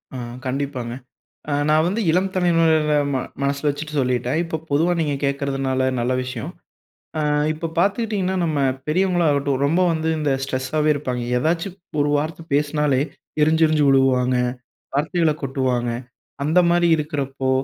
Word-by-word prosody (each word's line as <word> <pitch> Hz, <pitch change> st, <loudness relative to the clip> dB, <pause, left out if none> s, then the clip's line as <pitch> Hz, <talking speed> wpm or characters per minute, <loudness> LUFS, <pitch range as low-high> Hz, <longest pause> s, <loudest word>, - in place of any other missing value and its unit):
ஆ, -, -, -4 dB, 0.3 s
கண்டிப்பாங்க. 130 Hz, -3 st, -3 dB, 0.6 s
அ -, -, -1 dB, 0.2 s
நான் 155 Hz, +1 st, +4 dB
வந்து 200 Hz, +6 st, -1 dB
இளம் 185 Hz, +3 st, +2 dB
தலைமுறைகள 165 Hz, -4 st, +3 dB, 0.2 s
ம -, -, +2 dB, 0.3 s
மனசுல 140 Hz, +1 st, 0 dB
வச்சுட்டு 150 Hz, +1 st, -6 dB
சொல்லிட்டேன். 125 Hz, +3 st, 0 dB
இப்போ 165 Hz, -1 st, -3 dB
பொதுவா 165 Hz, +5 st, +2 dB
நீங்க 150 Hz, -3 st, 0 dB
கேக்குறதுனால 135 Hz, -1 st, 0 dB
நல்ல 120 Hz, +2 st, 0 dB
விஷயம். 125 Hz, -3 st, -5 dB, 0.7 s
அ -, -, +1 dB, 0.3 s
இப்ப 160 Hz, +1 st, -5 dB
பாத்துக்கிட்டீங்கன்னா 200 Hz, -1 st, 0 dB
நம்ம 155 Hz, -3 st, 0 dB, 0.3 s
பெரியவங்களா 180 Hz, 0 st, +2 dB
ஆகட்டும், 140 Hz, -1 st, 0 dB
ரொம்ப 165 Hz, +5 st, +2 dB
வந்து 160 Hz, 0 st, -1 dB
இந்த 150 Hz, -2 st, 0 dB
ஸ்ட்ரெஸ்ஸாவே 135 Hz, +4 st, 0 dB
இருப்பாங்க. 125 Hz, -4 st, -3 dB, 0.2 s
ஏதாச்சும் 170 Hz, +6 st, -1 dB, 0.2 s
ஒரு 145 Hz, -, +2 dB
வார்த்த 160 Hz, +2 st, -3 dB
பேசுனாலே 145 Hz, -2 st, +1 dB, 0.4 s
எரிஞ்சி 160 Hz, +1 st, +4 dB
எரிஞ்சி 155 Hz, -1 st, +2 dB
விழுவாங்க, 130 Hz, -2 st, +3 dB, 0.6 s
வார்த்தைகள 160 Hz, +2 st, +1 dB
கொட்டுவாங்க. 130 Hz, -3 st, -1 dB, 0.5 s
அந்த 165 Hz, +4 st, +4 dB
மாதிரி 175 Hz, 0 st, +3 dB
இருக்குறப்போ, 140 Hz, -3 st, -2 dB
150 Hz, 135 wpm, -21 LUFS, 135-165 Hz, 0.7 s, நான்